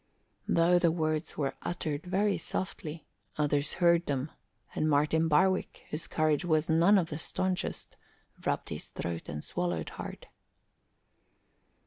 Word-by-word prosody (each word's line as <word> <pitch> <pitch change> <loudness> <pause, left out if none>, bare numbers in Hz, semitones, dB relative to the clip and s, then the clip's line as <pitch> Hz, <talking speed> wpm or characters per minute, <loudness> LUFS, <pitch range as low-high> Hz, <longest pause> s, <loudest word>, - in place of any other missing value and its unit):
Though 175 +1 +4
the 170 - +4
words 155 -1 -1
were 140 -3 0
uttered 155 -2 -3
very 200 +3 +2
softly, 160 -4 -4 0.3
others 145 -1 +1
heard 170 -1 +3
them, 140 +1 -1 0.4
and 155 - +1
Martin 150 +2 +3
Barwick, 185 +5 +2
whose 155 +2 -2
courage 155 0 +1
was 160 -2 +2
none 170 +6 +6
of 170 -3 +1
the 150 - -4
staunchest, 185 +2 -2 0.5
rubbed - - -1
his - - -5
throat 85 -1 -5
and 75 0 -5
swallowed 85 -3 -2
hard. - - -8
160 Hz, 130 wpm, -30 LUFS, 150-175 Hz, 0.5 s, none